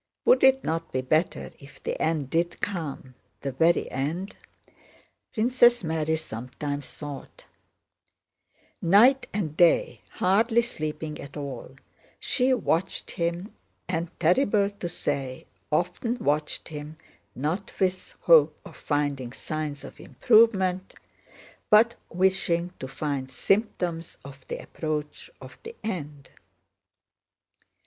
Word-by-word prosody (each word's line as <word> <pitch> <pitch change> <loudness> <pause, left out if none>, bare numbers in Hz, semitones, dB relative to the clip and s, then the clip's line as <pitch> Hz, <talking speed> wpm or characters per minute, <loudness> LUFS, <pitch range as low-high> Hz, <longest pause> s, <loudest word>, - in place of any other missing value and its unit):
"Would - - +5
it 265 0 +5
not 165 +1 -2
be 130 - -1
better 155 +6 0
if 140 -1 -15
the - - -3
end 155 -5 0
did 170 +1 0
come, 155 -9 -4 0.3
the 135 - -3
very 165 +6 +2
end?" 160 +9 -3 1.0
Princess 240 0 +4
Mary 160 -1 0
sometimes 145 +1 -5
thought. 145 -2 -9 1.4
Night 235 +10 +5
and 170 -8 -3
day, 175 0 +3
hardly 225 +5 +3
sleeping 155 -7 -5
at 140 +1 -10
all, 135 -2 -7 0.4
she 265 -1 +1
watched 190 -7 0
him 170 +4 -3 0.3
and, 170 -1 -2
terrible 200 - +3
to 195 -4 -6
say, 135 -6 -3 0.3
often 180 +9 0
watched 150 -7 -1
him 150 0 -8 0.4
not 160 +9 -2
with 185 -1 -1
hope 155 -2 +5
of - - -12
finding 145 -4 -1
signs 150 0 -5
of - - -11
improvement 195 -5 +3 0.7
but 230 +1 +6 0.2
wishing 180 -1 +1
to 130 - -5
find 135 -1 -3
symptoms 175 - -1
of 135 -1 -12
the - - -4
approach 150 - -4
of - - -12
the 460 +1 -9
end. 150 -9 -5
165 Hz, 115 wpm, -26 LUFS, 145-195 Hz, 1.4 s, but